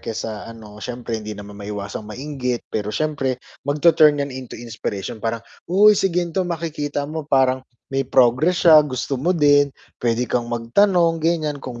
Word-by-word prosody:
kesa 110 -2 -5
ano, 110 -2 -11
siyempre 120 -2 -4
hindi 110 0 -6
naman 105 0 -10
maiwasang 100 0 -6
mainggit 125 0 -3
pero 105 0 -3
siyempre 135 -4 -1 0.2
magtu-turn 150 0 +4
'yan 140 -1 -3
into 130 -1 -8
inspiration 110 -3 -5
parang, 115 +1 -3 0.2
uy 205 +4 +5
si 190 -3 +1
gan'to, 180 +1 0
makikita 150 -4 -3
mo, 155 -1 -5
parang 130 -2 +2 0.3
may 135 -1 -1
progress 130 +8 +3
siya, 155 -3 +7
gusto 130 0 -3
mo 175 +7 +1
din, 145 -2 +5 0.3
pwede 120 0 0
kang 120 -1 0
magtanong 165 - +2
ganyan, 155 -3 0
kung 125 -3 -8
135 Hz, 160 wpm, -21 LUFS, 115-155 Hz, 0.3 s, siya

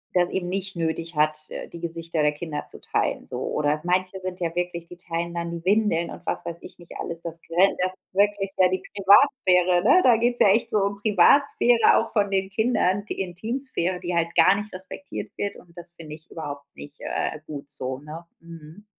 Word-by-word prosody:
das 175 -1 +3
eben 180 -2 -2
nicht 195 +1 -4
nötig 165 0 -3
hat, 155 0 +1
äh, - - -7
die 170 - -10
Gesichter 165 -1 -3
der 150 0 +3
Kinder 150 -1 -6
zu - - -10
teilen, - - -1
so. - - -6
Oder 150 +1 0
manche 185 +1 0
sind 185 -1 -6
ja 170 -2 -2
wirklich 175 -1 -3
die 180 - -11
teilen 170 -1 -4
dann 170 0 -3
die 170 0 -7
Windeln 200 -4 +2
und - - -10
was - - -2
weiß 170 -1 -5
ich - - -12
nicht 175 -1 -16
alles. 170 -1 -5
Das 165 0 -4
gren 180 +4 +2
das 185 0 +1
ist 185 - -32
wirklich, 200 0 +1
ja, 185 -1 +5
die 185 +1 -2
Privatsphäre, 190 -4 +4
ne? 320 - +6
Da 240 -3 +6
geht's 240 +2 +1
ja 200 - +6
echt 220 +4 +2
so - - +1
um 200 0 0
Privatsphäre 230 +3 +4
auch 230 - -1
von 205 -3 +2
den 190 0 0
Kindern, 205 -3 +1
die - - -6
Intimsphäre, 185 -1 -2
die 175 0 -4
halt 170 0 0
gar 185 - +6
nicht 210 +1 -5
respektiert 190 +9 -7
wird 200 0 -3
und 170 -1 -18
das 175 0 -10
finde 155 -2 -9
ich 160 +2 -20
überhaupt 145 -3 -6
nicht, 145 0 -12
äh, 150 - -3
gut 145 -2 -8
so, 130 0 -3
ne? 155 +3 -9 0.2
Mhm. 165 +3 -13
180 Hz, 215 wpm, -24 LUFS, 165-200 Hz, 0.2 s, ne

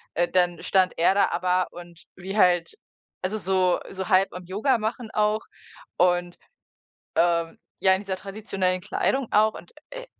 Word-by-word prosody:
äh, 175 +1 +2
dann 175 -2 +1
stand 185 -1 +1
er 170 +3 +4
da 200 - +3
aber 180 +1 0
und 175 -1 -12
wie 190 +2 -6
halt 175 -3 +3 0.5
also 195 +4 -2
so 185 -2 +1
so 190 +1 -5
halb 190 0 +3
am 180 0 -8
Yoga 215 +8 +1
machen 220 +1 -4
auch 215 +1 +1 0.6
und, 175 -1 +2 0.8
ähm, 170 -1 +1 0.2
ja, 190 0 +4
in 190 - -1
dieser 195 -2 -3
traditionellen 195 -2 -2
Kleidung 260 +5 -1
auch. 215 +1 +4
Und, - - -12 0.2
äh, - - -8
185 Hz, 160 wpm, -25 LUFS, 175-210 Hz, 0.8 s, er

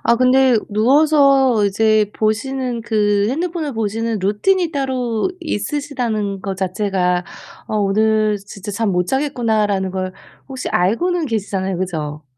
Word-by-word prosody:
아 235 - +4
근데 255 0 +4
누워서 270 0 +4
이제 215 +1 +2
보시는 240 +2 -1
그 205 -3 +1
핸드폰을 320 +1 -2
보시는 225 0 -2
루틴이 330 - +1
따로 255 - -1
있으시다는 240 - -2
것 195 -1 -4
자체가 185 -2 0 0.4
'어 215 - -1
오늘 215 +1 +2
진짜 200 0 -9
잠 205 0 -1
못 180 0 0
자겠구나.'라는 220 -8 0
걸 185 0 -3 0.4
혹시 260 -1 -5
알고는 320 - +1
계시잖아요. 195 -5 -2
그죠? 155 -5 -4
220 Hz, 285 characters per minute, -19 LUFS, 200-265 Hz, 0.4 s, 아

